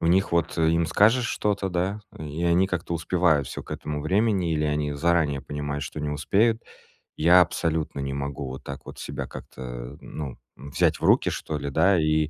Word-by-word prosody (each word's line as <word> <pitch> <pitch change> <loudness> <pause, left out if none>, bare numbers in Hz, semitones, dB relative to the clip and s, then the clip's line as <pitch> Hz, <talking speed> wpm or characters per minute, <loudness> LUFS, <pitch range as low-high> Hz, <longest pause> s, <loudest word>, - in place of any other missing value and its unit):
у 85 - 0
них 95 +3 +3
вот 85 0 +1
им 80 +1 +3
скажешь 115 +7 +4
что-то, 100 -2 -1
да, 95 +4 -1 0.2
и 75 +2 -4
они 85 +2 +4
как-то 85 -2 -3
успевают 80 -4 +2
всё - - -6
к - - -16
этому 75 -1 -4
времени 95 +1 +1
или 75 -1 0
они 75 -1 0
заранее 75 -2 +1
понимают, 75 -1 -4
что 75 +2 -6
не 75 0 -2
успеют. 110 +10 +2 0.6
Я 85 +3 +7
абсолютно 80 -4 -1
не 70 0 -3
могу 70 -1 -4
вот 65 +1 -7
так 70 - -8
вот - - -10
себя - - -5
как-то, 60 +2 -8
ну, 70 -5 -6 0.2
м, 70 +3 -10
взять - - +2
в - - -12
руки - - +4
что 75 - -4
ли, 70 0 -4
да, 85 +5 +4
и 75 0 +2
80 Hz, 195 wpm, -25 LUFS, 70-90 Hz, 0.6 s, Я